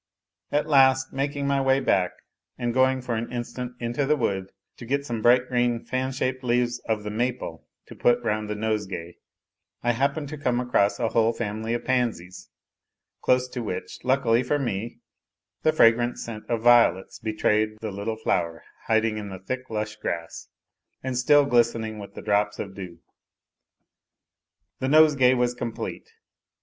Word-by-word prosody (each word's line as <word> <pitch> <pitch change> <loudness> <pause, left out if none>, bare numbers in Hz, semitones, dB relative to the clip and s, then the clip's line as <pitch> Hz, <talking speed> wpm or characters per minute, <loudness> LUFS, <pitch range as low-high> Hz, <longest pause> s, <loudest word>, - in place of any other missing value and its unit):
At 145 +1 +1
last, 130 -3 +4
making 140 +1 -2
my 140 0 +1
way 135 0 +3
back, 95 -8 +2 0.5
and 120 -2 -2
going 130 0 +2
for 125 -1 -3
an 115 +1 -3
instant 125 +1 -5
into 120 +4 -1
the 150 +2 +3
wood 95 -8 -2 0.3
to 120 - -9
get 140 +2 0
some 115 -4 -3
bright 125 +2 +4
green 120 -2 0
fan 130 +1 -2
shaped 130 0 -2
leaves 120 0 +1
of 110 -1 0
the 105 - -4
maple 115 - -3 0.2
to - - -11
put 120 0 +3
round 105 -1 -1
the 105 - -2
nosegay, 105 -5 -3 0.7
I 120 - +3
happened 140 +5 -1
to 155 -1 -7
come 125 -3 0
across 125 -5 +1
a 115 -2 +1
whole 115 0 +2
family 110 +1 -3
of 120 - -5
pansies, 115 -9 -2 0.7
close 125 0 +2
to 125 -1 -5
which, 95 -5 -5
luckily 125 -2 +3
for 135 +4 0
me, 115 -4 -4 0.6
the 155 - +3
fragrant 120 -4 +4
scent 110 -2 -7
of 115 -2 -1
violets 120 -6 +4
betrayed 110 -1 0
the 110 -2 -4
little 100 +3 -4
flower 85 -6 -1 0.2
hiding 110 -1 +2
in 105 -1 -6
the 95 - -7
thick 130 +7 -5
lush 105 -1 -3
grass 85 -1 -5 0.6
and 130 -1 -3
still 145 +4 +5
glistening 115 -4 +1
with 100 0 -10
drops 105 0 +1
of 100 -2 -6
dew. 90 -3 -9 1.8
The 130 - -1
nosegay 145 -4 +5
was 125 0 +1
complete. 120 -2 -5
120 Hz, 160 wpm, -25 LUFS, 110-130 Hz, 1.8 s, still